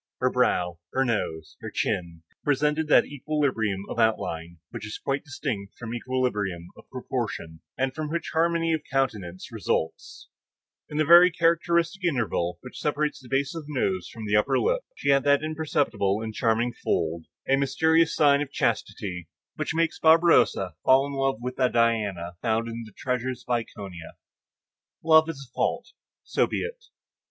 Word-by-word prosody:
Her - - +2
brow, 90 -1 +1
her 135 0 +2
nose, 80 -9 -3
her - - -5
chin, 85 -2 -2 0.2
presented 150 +2 +1
that - - +6
equilibrium 135 -9 -1
of - - -5
outline 85 -7 0
which - - -7
is 105 0 -5
quite 135 0 -2
distinct 130 -9 -5
from 115 0 -6
equilibrium 105 -9 -2
of - - -17
proportion, 80 -1 -4 0.2
and 130 +1 0
from 155 +1 -4
which 170 +2 -3
harmony 165 0 +2
of 160 - 0
countenance 105 -10 -2
results; 80 - -3 0.6
in 150 - -5
the 155 - +3
very 175 +3 +9
characteristic 170 +1 +1
interval 115 - 0
which 125 - -10
separates 150 0 -1
the 125 - -14
base 135 +1 0
of 160 -3 -7
the 150 - -7
nose 95 -7 -1
from 110 -2 -8
the 105 0 +1
upper 105 - +3
lip, - - +1
she - - -2
had 140 -1 +4
that 145 +1 +4
imperceptible 145 -10 0
and 110 -1 -5
charming 115 +2 +1
fold, 80 -1 -1 0.2
a 135 - +4
mysterious 160 +4 +2
sign 145 -1 +4
of 145 -1 -4
chastity, 90 - -2 0.3
which - - -3
makes 165 0 0
Barberousse 160 - +4
fall 135 +1 +5
in 140 - -6
love 135 -2 0
with 125 +1 -5
a 130 -1 +4
Diana 105 -7 0
found 115 0 0
in 115 0 -6
the - - -14
treasures 125 0 -3
of 125 - 0
Iconia. 100 -7 -5 0.9
Love 160 0 +6
is 140 -4 -7
a 120 - -35
fault; - - -1 0.3
so - - +1
be - - -2
it. 475 0 -7
130 Hz, 165 wpm, -26 LUFS, 105-155 Hz, 0.9 s, very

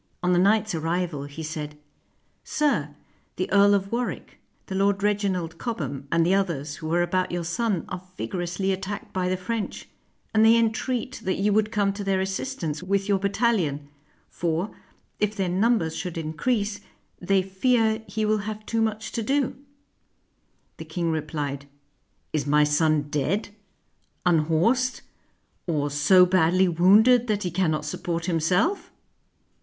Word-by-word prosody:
On 180 0 +3
the 175 - +4
knight's 210 +2 +3
arrival, 165 -2 -2
he 145 +3 -8
said, 150 -1 -5 0.7
''Sir, 150 - 0 0.4
the 185 - -2
Earl 200 +1 +6
of 195 0 -2
Warwick, 240 +1 -4 0.3
the - - -7
Lord 200 +1 +1
Reginald 190 -5 -1
Cobham, 145 - -4
and 170 0 +3
the 180 - +3
others 155 -7 -1
who 155 0 -5
are 175 +1 +3
about 185 +1 0
your 175 -1 -2
son 185 +1 -1
are 180 -1 -6 0.2
vigorously 180 +1 -2
at 190 0 -2
tacked 200 +1 -6
by 185 -1 0
the 185 - 0
French; 215 +4 -4 0.5
and 220 0 +4
they 225 +1 +7
entreat 230 +2 -1
that 185 - 0
you 205 +1 +2
would 215 0 +2
come 205 -3 +1
to 200 0 -5
their 195 -1 +1
assistance 155 -4 -3
with 195 +2 0
your 200 -2 +2
battalion, 190 - 0 0.4
for, 170 +4 -2 0.4
if 210 0 0
their 195 -3 -1
numbers 185 -3 +1
should 180 -2 -5
increase, 205 +6 -1 0.4
they 190 +1 +2
fear 220 +3 +1
he 215 -1 -2
will 215 0 +2
have 215 +1 -6
too 225 -1 -1
much 220 0 -2
to 230 - -2
do." 270 +4 0 1.2
The - - -8
king 170 -3 -2
replied, 145 -3 -3 0.7
''Is 145 -2 -1
my 150 +1 +4
son 150 0 +2
dead, 150 - -1 0.8
unhorsed, 175 +10 +2 0.7
or 145 -4 0
so 165 +6 +6
badly 185 +1 +3
wounded 210 +8 +5
that 210 -2 0
he 180 - -2
cannot 160 -4 0
support 170 +2 -3
himself?" 180 - +1
185 Hz, 150 wpm, -25 LUFS, 160-210 Hz, 1.2 s, they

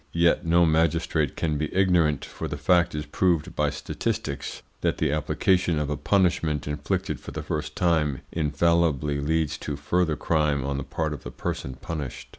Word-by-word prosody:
Yet 85 0 +4
no 85 +1 +4
magistrate 80 -2 +1
can 75 -2 -1
be 75 -1 -2
ignorant, 90 -7 +3
for - - -6
the 75 - -4
fact 85 +3 +3
is 75 0 -3
proved 85 +2 0
by 75 -1 +2
statistics, 70 -1 -4 0.2
that - - +1
the - - +1
application 90 +3 +1
of 75 -1 -1
a - - 0
punishment 85 -3 +1
inflicted 75 0 -2
for - - -9
the 75 +2 -5
first 75 -1 -3
time 80 -7 +1
infallibly 80 -2 +1
leads 80 +1 0
to 75 - -4
further 80 +3 +1
crime 75 -4 +1
on 70 0 -1
the - - -3
part 80 +2 -2
of 70 - -7
the - - -7
person 65 +1 -4
punished. 75 0 -6
75 Hz, 175 wpm, -26 LUFS, 75-85 Hz, 0.2 s, Yet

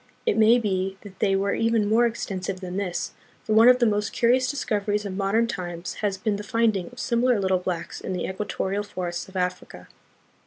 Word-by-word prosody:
It - - +2
may 225 +2 +6
be 190 -4 -1
that 200 -2 -13
they 195 -1 +2
were 200 +1 +1
even 225 -2 +1
more 230 +3 +4
extensive 195 -4 -4
than 185 0 -5
this, 175 -4 -2 0.3
for 215 - -1
one 225 +2 +7
of 250 0 +8
the 245 - +3
most 210 -2 0
curious 250 +2 +3
discoveries 210 -6 -1
of 190 -2 -4
modern 200 +4 +2
times 175 -5 -5
has 200 -2 0
been 210 0 -1
the 205 - -6
finding 225 -5 +1
of 250 - -17
similar 245 -2 +2
little 190 -1 +1
blacks 180 -2 -4
in - - -5
the 180 - -2
equa 190 +2 -4
torial 200 +1 -2
forests 175 -3 -5
of 190 - -17
Africa. 180 0 -3
205 Hz, 205 wpm, -25 LUFS, 185-225 Hz, 0.3 s, of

